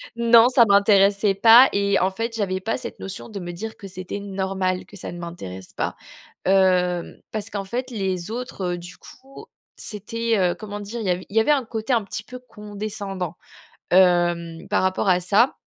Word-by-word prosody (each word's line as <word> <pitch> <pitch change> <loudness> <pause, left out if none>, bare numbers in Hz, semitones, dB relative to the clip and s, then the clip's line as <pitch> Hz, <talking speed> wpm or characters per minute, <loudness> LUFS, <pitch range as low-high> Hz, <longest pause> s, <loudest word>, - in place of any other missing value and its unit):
Non, 235 0 +6
ça 250 -2 +6
m'intéressait 200 0 +4
pas 230 +6 +7
et 200 0 +2
en 185 +1 +1
fait, 230 +4 -4
j'avais 190 -4 -1
pas 220 +4 -2
cette 245 -2 -8
notion 195 +4 -7
de 210 -3 -6
me 175 -1 -6
dire 220 +6 -7
que 200 - -9
c'était 185 +1 -6
normal, 190 -2 -2
que - - -15
ça 200 - -7
ne 175 - -8
m'intéresse 95 - -8
pas. - - -3 0.5
Hem, 180 -2 +2
parce 215 0 -4
qu'en 200 -1 -4
fait, 250 +6 -4
les 190 -4 -3
autres, 220 -7 -4
du 175 0 -10
coup, 270 +1 -14 0.3
c'était, 225 +2 -2
heu, 180 -2 +2
comment 205 -1 -7
dire? 210 +4 -6
Il 215 - -4
y - - +1
avait 180 +1 -2
il 205 - -9
y - - +7
avait 220 - +1
un 280 -3 +3
côté 220 +2 -3
un 235 -2 +3
petit 205 +2 -6
peu 250 - -9
condescendant, 205 -6 -6 0.5
hem, 175 -2 +2
par - - +1
rapport 185 +1 0
à 180 -1 +5
ça 200 +8 +2
200 Hz, 195 wpm, -23 LUFS, 185-225 Hz, 0.5 s, pas